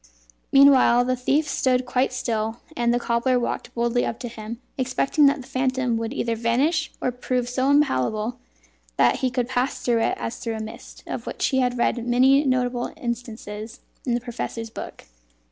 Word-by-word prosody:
Meanwhile, 270 -3 +6
the 255 0 +1
thief 280 +5 +1
stood 255 -3 +1
quite 250 +1 +1
still, 225 -3 -2 0.2
and 235 0 +1
the 240 - +2
cobbler 240 +2 +1
walked 240 0 -3
boldly 235 +1 +1
up 230 - -2
to 245 - -4
him, 225 0 -7 0.2
expecting 265 +3 +2
that 280 0 +2
the - - -15
phantom 260 -2 0
would 225 0 -3
either 235 -4 -1
vanish 270 +8 +1
or 250 - 0
prove 250 0 -2
so 260 +2 0
impalpable 230 - +1 0.6
that 120 - +4
he 260 - 0
could 250 -1 -1
pass 255 +1 -1
through 235 -2 +1
it - - 0
as 230 - -4
through 230 -2 -4
a - - -5
mist, 220 +1 -9
of - - -6
which - - -2
he 265 - +1
had 250 -1 +1
read 240 0 0
many 265 +4 +5
notable 250 -2 0
instances 225 -2 -6 0.2
in 245 -3 0
the 240 - -1
professor's 230 -2 -5
book. - - -8
245 Hz, 180 wpm, -24 LUFS, 235-260 Hz, 0.6 s, Meanwhile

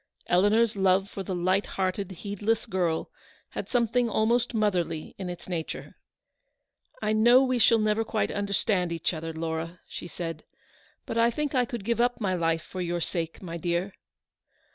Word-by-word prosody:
Eleanor's 205 +5 +3
love 195 0 +3
for 195 - -5
the 190 0 -3
light 185 +3 +1
hearted, 190 0 0
heedless 205 +4 -1
girl, 180 -6 -1 0.4
had - - -5
something 240 0 +2
almost 235 +3 +2
motherly 180 -8 0
in 185 -2 -4
its 175 -1 -8
nature. 170 -3 -4 0.5
" - - -33
I 215 0 +2
know 240 +4 +6
we 255 -2 +1
shall 230 +1 +6
never 215 0 +2
quite 220 -1 -1
understand 200 -3 0
each 165 +1 -1
other, 165 0 -4
Laura," 160 +1 -4
she - - -7
said; 165 -3 -5 0.3
" - - -32
but 230 - -2
I 230 +1 +5
think 295 +4 -2
I 250 -2 +3
could 235 -4 -6
give 235 +1 +1
up 245 -1 +1
my 195 -4 0
life 165 -2 +1
for 185 - -6
your 175 0 -1
sake, 165 +1 -3
my 170 -2 -5
dear." 175 +3 -1
195 Hz, 175 wpm, -27 LUFS, 175-225 Hz, 0.5 s, know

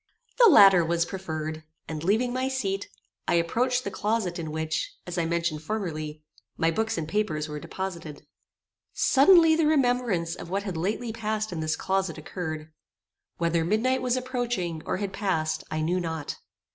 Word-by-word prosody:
The 465 - +9
latter 195 - +8
was 170 +1 +1
preferred, 160 -4 -5 0.2
and, 155 -1 -5
leaving 225 +7 +1
my 255 +1 0
seat, 200 -7 -2 0.4
I - - +3
approached 245 +9 +1
the 200 - -4
closet 205 -4 -1
in 160 -2 -4
which, 160 0 -2
as 180 - -5
I 165 - +1
mentioned 170 -2 -1
formerly, 155 -5 -4 0.3
my 165 0 +2
books 220 +4 -1
and 160 -2 -3
papers 160 -5 -1
were 150 -1 -5
deposited. 170 -4 -6 0.7
Suddenly 325 +3 +6
the 320 -1 +2
remembrance 245 - +1
of 170 - -8
what 195 +2 -1
had 190 -4 -4
lately 215 +7 -2
passed 215 -1 -2
in 170 - -4
this 155 0 0
closet 190 -3 -1
occurred. 155 -1 -6 0.7
Whether 170 -1 +1
midnight 230 +8 +1
was 250 0 +1
approaching, 245 -10 -2
or - - 0
had 195 -1 -4
passed, 160 -6 -1
I 155 - -2
knew 175 +4 +1
not. 160 -4 -4
185 Hz, 165 wpm, -27 LUFS, 160-225 Hz, 0.7 s, The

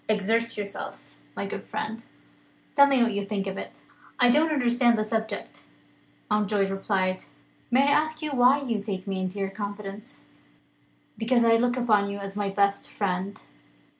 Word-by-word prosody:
Exert 225 +2 +1
yourself, 200 -1 -7 0.2
my - - -3
good - - -5
friend. 225 +1 -5 0.7
Tell 280 0 +7
me 270 -3 +4
what 230 -2 +1
you 200 0 -1
think 200 -1 -3
of 195 -1 -4
it?" - - -9 0.4
"I 245 -1 +6
don't 310 +4 +3
understand 240 -4 +3
the 215 - +1
subject," 220 -1 -4 0.6
Mountjoy 210 -1 +1
replied. 195 -1 -1 0.4
"May 255 +2 +4
I 285 - +3
ask 310 0 -5
why 275 -2 +3
you 230 -6 -1
take 195 -3 -4
me 195 -2 -3
into 185 +2 -3
your 195 -1 -2
confidence?" 205 +3 -7 1.0
"Because 235 +1 +3
I 230 0 +5
look 245 +2 +1
upon 210 -5 +2
you 200 - -4
as 195 0 -7
my 205 -1 -1
best 200 0 +1
friend." 195 0 -2
215 Hz, 165 wpm, -26 LUFS, 200-240 Hz, 1.0 s, Tell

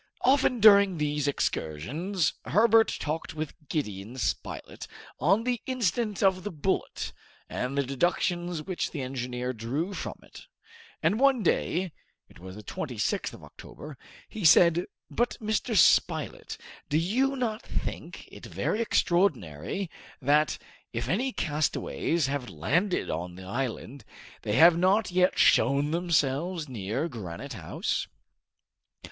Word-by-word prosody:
Often 255 -2 +3
during 200 -3 +7
these 150 -1 -1
excursions, 145 - -1
Herbert 225 - +5
talked 155 +1 -4
with 155 -1 -4 0.2
Gideon 110 - -4
Spilett 125 - -4 0.3
on 195 +8 +3
the 245 -2 -1
incident 230 -5 -1
of 190 -2 +3
the 205 - -3
bullet, 175 +3 -2 0.3
and 130 +3 -3
the 140 - +3
deductions 175 +4 -1
which 185 0 -3
the 145 -5 -5
engineer 125 -1 -3
drew 135 - -3
from - - -5
it, - - -14 0.6
and 215 - +2
one 270 -4 +4
day 180 0 0 0.4
it - - -18
was 95 +1 -10
the 105 - -10
26th 125 - -2
of - - -12
October 150 -1 -11 0.3
he 215 - -7
said 170 +2 +6 0.2
"But, 240 +1 0
Mr. 220 0 -1
Spilett, - - +2 0.3
do 150 - +2
you 250 +12 +1
not 235 -3 -2
think - - -6
it - - -10
very 220 - -1
extraordinary 170 - 0 0.3
that, 150 +3 +2 0.3
if 120 0 -3
any 245 - 0
castaways 155 - -1
have 135 -2 -3
landed 175 - 0
on 85 +2 -4
the 95 - -10
island, 130 +4 -4 0.4
they 105 - -2
have 165 +7 +7
not 190 +4 +2
yet 180 +1 +2
shown 140 +2 +4
themselves 165 0 0
near 115 - -3
Granite 115 - -7
House?" 90 -8 -3
160 Hz, 130 wpm, -28 LUFS, 130-195 Hz, 0.6 s, during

